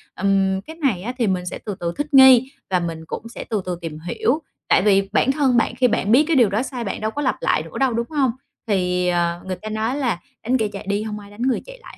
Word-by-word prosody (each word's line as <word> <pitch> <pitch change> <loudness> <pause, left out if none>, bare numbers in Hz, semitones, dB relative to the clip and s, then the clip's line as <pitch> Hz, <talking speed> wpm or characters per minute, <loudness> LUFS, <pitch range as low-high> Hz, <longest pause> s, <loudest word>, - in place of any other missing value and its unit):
Ừm, 195 0 +1
cái 320 +9 -11
này 270 - 0
á 240 +6 -4
thì 235 -5 +1
mình 180 -2 -1
sẽ 180 - -5
từ 205 - -4
từ 170 0 -2
thích 290 +1 -4
nghi 265 -1 +7 0.2
và 185 -1 +2
mình 165 -2 -5
cũng 230 - -6
sẽ 235 - -7
từ 215 -3 0
từ 180 -2 -3
tìm 155 -2 -6
hiểu, 235 - -1 0.3
tại - - +4
vì 195 -1 +3
bản 270 - +3
thân 270 -4 +2
bạn 230 +1 +1
khi 250 0 +3
bạn 215 -2 0
biết 260 +6 +6
cái 330 - +2
điều 240 -7 +5
đó 210 +4 0
sai 255 -3 -5
bạn 205 - -4
đâu 215 0 -1
có 290 - -4
lặp 260 - +1
lại 155 - +1
nữa 165 - -9
đâu, 265 -3 +2
đúng 235 +3 -2
hông? 275 -6 +1 0.4
Thì, 180 -3 +1
ờ, 175 -1 0
người 185 -1 -3
ta 215 +5 -8
nói 220 +4 -1
là 245 -11 -1 0.2
đánh 250 +3 +2
kẻ 220 -3 0
chạy 200 -1 -8
đi 200 +1 0
hông 210 -1 -5
ai 205 0 -13
đánh 205 - -11
người 255 0 +1
chạy - - -11
lại - - -13
215 Hz, 280 wpm, -21 LUFS, 185-255 Hz, 0.4 s, nghi